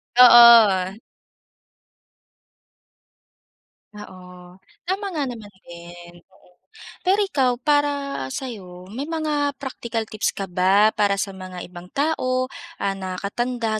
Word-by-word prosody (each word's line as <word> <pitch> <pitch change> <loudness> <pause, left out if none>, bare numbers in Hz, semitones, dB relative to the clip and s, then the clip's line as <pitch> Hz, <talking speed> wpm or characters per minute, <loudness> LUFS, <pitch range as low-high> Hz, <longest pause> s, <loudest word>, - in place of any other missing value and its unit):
Oo. 230 -6 +7 3.0
Oo, 180 -3 -13 0.3
tama 390 +2 -2
nga 305 -3 -2
naman 220 -4 -10 0.2
din, 175 0 -12 0.2
oo. 180 -1 -25 0.5
Pero 395 +3 +3
ikaw 265 -10 0
para 285 - 0
sa'yo, 185 -8 -8
may 265 +6 -5
mga 300 -3 -2
practical 235 -4 -5
tips 215 - -2
ka 195 - -4
ba 190 +4 +3
para 205 -2 +1
sa 195 0 -3
mga 185 -1 -9
ibang 175 0 -11
tao, 255 -4 -1 0.3
ah, 200 - 0
nakakatanda 215 +5 -3
215 Hz, 105 wpm, -22 LUFS, 185-270 Hz, 3.0 s, Oo